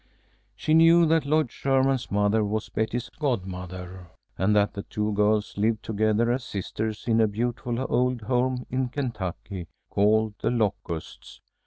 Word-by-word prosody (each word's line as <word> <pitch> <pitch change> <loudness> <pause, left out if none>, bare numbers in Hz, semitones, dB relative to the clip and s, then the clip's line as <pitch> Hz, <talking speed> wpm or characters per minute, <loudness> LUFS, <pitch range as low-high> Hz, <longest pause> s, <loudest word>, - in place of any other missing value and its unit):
She 155 - 0
knew 165 +1 +7
that 160 -2 +2
Lloyd 155 -4 +2
Sherman's 135 -3 +1
mother 105 +2 +2
was 105 +1 -2
Betty's 110 +3 -2
godmother, 90 - -4 0.3
and 105 +2 +2
that 105 0 +3
the 100 - -5
two 105 +1 -2
girls 105 0 +1
lived 110 +1 +1
together 110 +2 +1
as 125 +1 -1
sisters 110 0 -4
in 115 -1 +3
a 110 - +4
beautiful 120 +2 -2
old 125 -1 +1
home 125 +2 0
in 130 0 0
Kentucky 100 - -4 0.2
called 110 +1 +3
"The - - +1
Locusts." 100 -8 -3
110 Hz, 145 wpm, -26 LUFS, 105-125 Hz, 0.3 s, knew